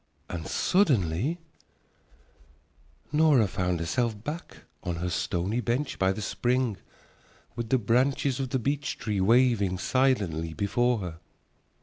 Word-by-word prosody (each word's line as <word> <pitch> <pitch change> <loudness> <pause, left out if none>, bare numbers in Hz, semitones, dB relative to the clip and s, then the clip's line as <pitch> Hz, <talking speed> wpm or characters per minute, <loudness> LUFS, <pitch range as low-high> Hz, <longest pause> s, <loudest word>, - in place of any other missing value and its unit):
And 85 -3 -5
suddenly 135 - +2 1.7
Nora 150 -7 +4
found 90 -2 -1
herself 110 +5 -1
back 155 +6 -7 0.2
on 85 - -3
her 90 +2 -3
stony 90 +5 -1
bench 130 +4 -2
by 95 0 +3
the 105 +2 -4
spring 120 +2 0 0.8
with 120 -1 -4
the 130 - +4
branches 130 +4 +1
of 135 -2 -2
the 130 - 0
beech 140 +3 -2
tree 105 -3 -2
waving 110 -3 +3
silently 95 -8 0
before 120 +6 +1
her. 85 -3 -6
115 Hz, 120 wpm, -27 LUFS, 95-130 Hz, 1.7 s, Nora